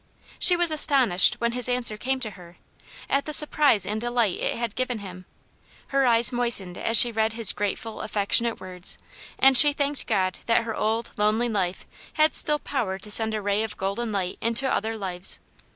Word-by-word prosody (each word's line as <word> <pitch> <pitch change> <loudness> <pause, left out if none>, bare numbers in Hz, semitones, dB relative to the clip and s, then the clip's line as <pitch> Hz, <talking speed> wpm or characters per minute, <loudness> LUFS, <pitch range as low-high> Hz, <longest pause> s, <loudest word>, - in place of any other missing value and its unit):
She 360 - +5
was 345 -2 +1
astonished, 265 - +3
when 235 0 -2
his 250 0 -1
answer 245 -3 -1
came 260 +5 -3
to 215 -4 -5
her, 175 -2 -15 0.5
at 280 0 -1
the 305 - -3
surprise 295 -8 +3
and 215 +1 -4
delight 240 -5 -1
it - - -2
had 235 -2 -4
given 255 -2 -3
him. 185 -3 -10 0.6
Her 275 -1 +1
eyes 235 +1 +3
moistened 235 -7 0
as 225 +4 +1
she 240 - +7
read 220 0 -1
his 225 -3 +2
grateful, 205 +2 -5
affectionate 215 +3 +1
words, 185 -1 -4 0.4
and 270 0 +4
she 290 +3 +7
thanked 285 -1 -2
God 185 -1 -1
that 230 0 +2
her 225 -1 -5
old, 225 +2 -2
lonely 215 +3 0
life 190 -4 -3 0.3
had 310 0 +2
still 300 - +3
power 230 -10 -3
to 210 +2 -5
send 220 +1 +2
a 210 - -5
ray 205 +1 0
of 220 -1 -5
golden 200 +4 -3
light 190 -3 -4
into 230 +4 0
other 225 -3 -2
lives. 185 -2 -4
225 Hz, 190 wpm, -24 LUFS, 200-250 Hz, 0.6 s, she